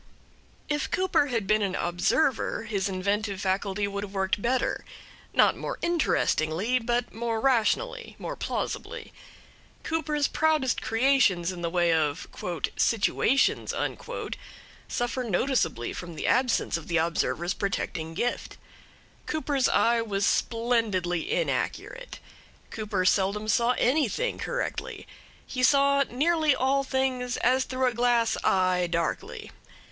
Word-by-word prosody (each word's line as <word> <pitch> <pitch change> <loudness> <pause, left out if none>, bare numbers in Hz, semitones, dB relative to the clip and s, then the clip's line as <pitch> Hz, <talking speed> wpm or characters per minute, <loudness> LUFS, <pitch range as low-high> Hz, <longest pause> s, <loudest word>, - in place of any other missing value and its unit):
If 295 -1 -1
Cooper 370 -6 +2
had 230 -6 -1
been 215 +2 +2
an 195 -2 -1
observer 215 - 0
his 205 -3 -2
inventive 200 +1 -1
faculty 195 +1 -1
would 200 0 -4
have 200 -1 -8
worked 190 +1 0
better; 250 +3 0 0.5
not - - +4
more - - -5
interestingly, 235 - +1
but 240 0 -1
more 230 0 -2
rationally, 270 - 0
more - - -5
plausibly. - - -4 0.7
Cooper's 300 -3 0
proudest 310 -5 +1
creations 225 -8 +2
in 180 -2 -8
the 170 - -1
way 175 -1 +2
of 150 -3 0 0.5
"situations" 230 +4 +2 1.1
suffer 245 +1 -2
noticeably 225 - 0
from 170 -2 -7
the - - -4
absence 250 -8 +2
of 165 - -10
the 170 - +1
observer's 170 +2 0
protecting 165 -5 -3
gift. 245 +7 -2 0.7
Cooper's 290 -4 0
eye 235 0 +3
was 200 -3 -1
splendidly 220 -9 0
inaccurate. - - -2 0.5
Cooper 205 -4 -2
seldom 200 +3 +1
saw 235 +3 +3
anything 300 - +1
correctly. - - -4 0.4
He 255 - -4
saw 280 +1 +4
nearly 310 +2 +2
all 270 +2 +1
things 260 -2 -1
as 255 +2 +2
through 260 0 -1
a 250 - +2
glass 240 -1 +2
eye, 185 -1 +2
darkly. 170 -1 -3
230 Hz, 120 wpm, -27 LUFS, 190-265 Hz, 1.1 s, not